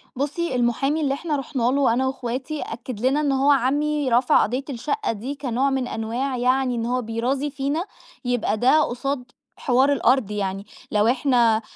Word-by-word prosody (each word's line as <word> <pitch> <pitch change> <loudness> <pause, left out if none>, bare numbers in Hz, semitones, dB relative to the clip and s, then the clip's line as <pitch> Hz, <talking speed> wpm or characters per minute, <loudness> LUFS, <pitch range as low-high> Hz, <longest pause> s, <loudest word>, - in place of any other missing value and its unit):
بُصي، 285 +2 -2
المحامي 250 +5 +1
اللي 275 -2 +1
إحنا 305 +2 -2
رُحنا 270 -2 -3
له 270 -3 +3
أنا 260 +2 +1
وأخواتي 265 +3 -4
أكد 235 0 -6
لنا 275 +3 +2
إن 290 -2 +1
هو 270 +2 +3
عمي 290 +2 +1
رفع 245 +1 +4
قضية 250 +5 -2
الشقة 300 - -2
دي 235 +6 -5
كنوع 265 -1 0
من 265 -2 -1
أنواع 245 +5 -3
يعني 255 +1 +1
إن 230 -1 -2
هو 250 +1 0
بيرازي 245 +5 -2
فينا، 285 +4 -2 0.4
يبقى 245 -3 0
ده 260 +7 +4
قصاد 250 0 -3 0.3
حوار 265 +3 +3
الأرض 255 -4 +2
يعني، 195 -1 -3 0.3
لو 210 +1 +3
إحنا 240 -3 +3
260 Hz, 170 wpm, -23 LUFS, 240-280 Hz, 0.4 s, رفع